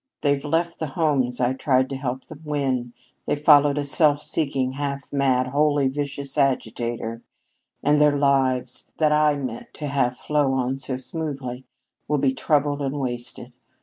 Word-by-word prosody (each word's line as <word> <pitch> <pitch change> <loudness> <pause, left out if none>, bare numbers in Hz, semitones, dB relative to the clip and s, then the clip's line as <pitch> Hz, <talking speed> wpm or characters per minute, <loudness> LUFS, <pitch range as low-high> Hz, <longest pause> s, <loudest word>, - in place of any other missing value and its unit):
They've 140 -1 +1
left 165 +3 -1
the 160 - -2
homes 135 -5 0
I 125 +1 +2
tried 130 -1 +1
to - - -2
help 130 -1 -4
them 155 -1 -12
win, 135 -5 -1 0.4
they've 145 - 0
followed 145 -1 +5
a 145 - -1
self 145 +1 +4
seeking, 140 -4 -1
half 140 0 -5
mad, 130 -2 +2
wholly 145 0 +2
vicious 140 0 -2
agitator, 120 -3 -1 0.6
and 150 0 +3
their 145 -1 +4
lives, 130 -3 +1
that 155 -1 +3
I 150 -1 +3
meant 130 -5 -6
to 150 - -5
have 135 -3 0
flow 145 -3 0
on 130 +1 -1
so 130 -1 -1
smoothly, 130 -3 -5 0.4
will 150 - +1
be 135 -1 +2
troubled 145 0 0
and 140 +1 -2
wasted. 120 -2 -3
140 Hz, 160 wpm, -23 LUFS, 130-145 Hz, 0.6 s, followed